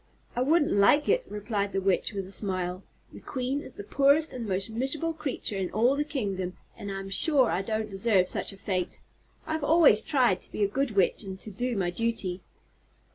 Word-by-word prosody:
"I 245 - 0
wouldn't 300 +3 +3
like 205 +9 +4
it," - - +2
replied 205 -1 -3
the 195 - +1
Witch, 195 +2 +1
with 195 -3 -4
a 190 - -12
smile. 185 -3 -2 0.3
"The - - -10
Queen 265 +2 -3
is - - -8
the - - -7
poorest 280 +8 +3
and 235 -3 -5
most 190 +2 -1
miserable 270 +8 0
creature 270 -9 -4
in 185 - -2
all 240 +5 +2
the 295 - 0
kingdom 195 -11 -3 0.2
and 200 - -7
I'm 195 0 -5
sure 270 +2 +4
I 185 - 0
don't 215 +2 -2
deserve 195 -2 +2
such - - +1
a 195 - -12
fate. 185 -2 -3 0.5
I've 315 -1 -3
always 300 -8 +5
tried 245 -10 +2
to - - -10
be 210 - -1
a - - +3
good 270 +6 -1
witch 190 -3 +2
and 190 -3 -7
to 215 - -8
do 240 +3 -2
my 180 -2 0
duty." 195 -3 -2
215 Hz, 205 wpm, -27 LUFS, 195-270 Hz, 0.5 s, always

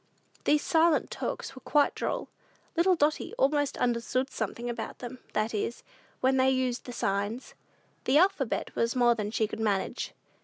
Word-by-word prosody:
These 295 0 +3
"silent 325 0 +3
talks" - - -4
were 260 - -11
quite 290 +3 +3
droll. - - -2 0.5
Little 360 +2 +4
Dotty 305 -1 0
almost 290 +1 +2
understood 250 +2 0
something 230 +2 -3
about 235 -2 -4
them; 250 +1 -7
that 215 +2 0
is, 220 +3 -2 0.4
when 265 +1 +3
they 260 0 +4
used 255 -2 0
the 245 - -6
signs: 205 +2 -2 0.5
the 265 - +4
alphabet 350 - +1
was 230 +2 +1
more 240 -1 +5
than 210 -3 -3
she 220 0 +1
could 215 - -7
manage. 205 -3 -1
255 Hz, 160 wpm, -29 LUFS, 230-290 Hz, 0.5 s, more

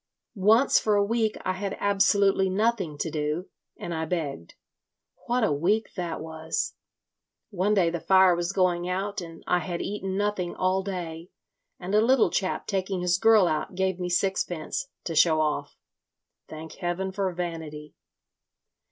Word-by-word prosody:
"Once 220 +6 +4
for 210 -1 +1
a 200 0 +3
week 220 0 0
I 185 - +1
had 195 +1 -4
absolutely 200 -1 +3
nothing 195 -6 0
to 160 +2 -3
do, 150 +4 -2 0.3
and 175 - -5
I 160 0 -2
begged. 150 - -4 0.7
What 245 0 +1
a 215 - +2
week 195 +10 0
that 175 -3 -4
was! 160 0 -3 0.8
One 200 +2 +1
day 175 -4 +3
the 170 - -3
fire 190 0 +5
was 175 +1 -2
going 180 -2 +1
out 195 +2 -2
and 165 -1 -10
I 180 - +2
had 170 +1 -4
eaten 195 -2 -3
nothing 205 -4 -1
all 185 +1 +1
day, 175 -3 -6 0.5
and 185 +2 -5
a 210 - +5
little 250 +1 +4
chap 185 - -1
taking 190 -2 -2
his 180 +1 +1
girl 220 -4 +5
out, 155 +3 -2
gave 190 -1 0
me 180 0 -2
sixpence—to 180 - -2
show 160 0 +5
off. 155 -1 -1 0.7
Thank 155 +1 -9
heaven 190 +1 -2
for 190 -1 -1
vanity! 160 -4 -6
185 Hz, 155 wpm, -26 LUFS, 170-200 Hz, 0.8 s, fire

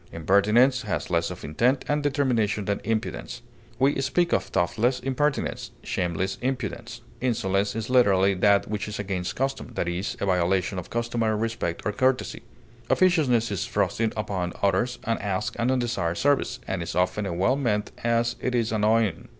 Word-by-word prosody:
Impertinence 105 - +3
has 105 -5 -3
less 85 -1 +1
of 90 0 -8
intent 125 - +1
and 145 0 +1
determination 125 -8 +1
than 100 0 -1
impudence. 110 0 -3 0.3
We 135 +1 +2
speak 175 +5 +1
of - - +2
thoughtless 120 +8 0
impertinence, 140 +2 -1
shameless 90 +2 -2
impudence. 125 -4 -4 0.2
Insolence 100 -5 0
is 115 0 -3
literally 100 -6 +4
that 100 +1 +3
which 105 -1 -3
is 105 - -5
against 95 -3 -3
custom, 135 +1 -3
i. - - +1
e., 90 +1 -2 0.2
the - - -2
violation 95 +1 +1
of 90 - -9
customary 115 -2 0
respect 110 -6 -3
and 105 - -1
courtesy. 130 +1 0 0.5
Officiousness 140 - +3
is 100 - -2
thrusting 115 -1 0
upon 95 -4 -2
others 120 +5 +1
unasked 105 -3 -2
and 115 +2 +1
undesired 120 -10 0
service, 145 0 +1
and 95 -2 -2
is 85 - -5
often 90 +3 0
as 90 - -3
well 95 +10 +2
meant 110 -7 -1
as 115 0 +1
it 125 - -1
is 115 -2 +1
annoying. 110 -4 +1
110 Hz, 160 wpm, -25 LUFS, 95-125 Hz, 0.5 s, literally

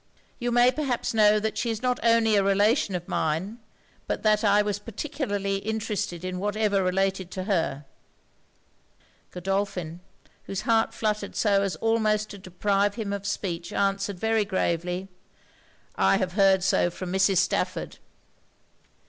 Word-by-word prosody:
You 240 -1 -1
may 245 +1 +5
perhaps 265 -6 -2
know 215 -1 +5
that 220 +1 -2
she 235 - -1
is 225 +1 -3
not 250 -1 +1
only 230 -2 +4
a 200 - +4
relation 205 +2 +2
of 175 -1 -5
mine, 170 +9 -2 0.5
but - - -3
that 215 0 +3
I 205 0 +4
was 205 -1 -2
particularly 205 -4 -3
interested 205 -4 -3
in 185 0 -4
whatever 205 0 +1
related 190 0 0
to 185 0 -5
her.' 165 -8 -1 1.4
Godolphin, 180 -2 -3 0.5
whose 195 -1 -4
heart 225 -1 +1
fluttered 210 -2 -2
so 200 -2 +2
as 195 -4 -1
almost 215 +2 +1
to 200 - -9
deprive 200 +2 0
him 215 -4 -3
of 200 0 -4
speech, 175 -4 -3
answered 195 -1 -1
very 225 +1 +2
gravely 180 -1 -2 0.9
'I 95 0 +3
have 180 -1 -2
heard 195 -2 +4
so 175 - +2
from 180 +1 -6
Mrs. 190 0 +3
Stafford.' 185 +1 -1
200 Hz, 145 wpm, -26 LUFS, 185-215 Hz, 1.4 s, may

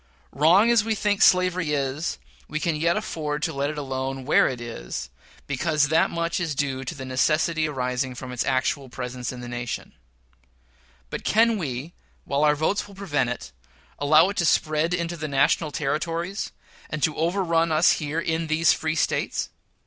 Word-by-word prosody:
Wrong 175 - +5
as 235 -3 +4
we 220 0 0
think 205 -1 0
slavery 185 -4 +4
is, 140 +3 -1 0.3
we 155 - -3
can 165 0 0
yet 170 +3 +1
afford 150 -2 -3
to - - 0
let 140 +1 -1
it 150 - -5
alone 135 -1 -3
where 150 - +4
it 125 -2 -3
is, 60 - -6 0.3
because 145 +1 +1
that 160 +1 +3
much 170 +1 -1
is 165 -5 -2
due 135 -1 -1
to 165 - -4
the 135 -2 -7
necessity 155 +5 +1
arising 125 -1 -2
from 125 +1 -7
its 125 - -1
actual 130 +1 0
presence 125 -1 -5
in 125 -1 -8
the 120 - -7
nation; 120 0 -5 1.2
but - - -5
can 230 +1 +4
we, 150 - -4 0.3
while 140 +1 0
our 150 -1 +4
votes 160 +8 0
will 200 - -14
prevent 145 -10 -1
it, 125 - -6 0.5
allow 155 +4 +5
it 200 - -5
to 170 - +2
spread 155 +2 +2
into 170 0 -3
the 155 -2 -4
national 150 +3 +2
Territories, 165 +7 -2 0.4
and 150 -1 -4
to 155 - +2
overrun 170 -1 +1
us 155 +2 +4
here 155 +1 -2
in 165 0 -1
these 160 +1 +4
free 160 0 -2
States? - - 0
155 Hz, 180 wpm, -25 LUFS, 135-170 Hz, 1.2 s, Wrong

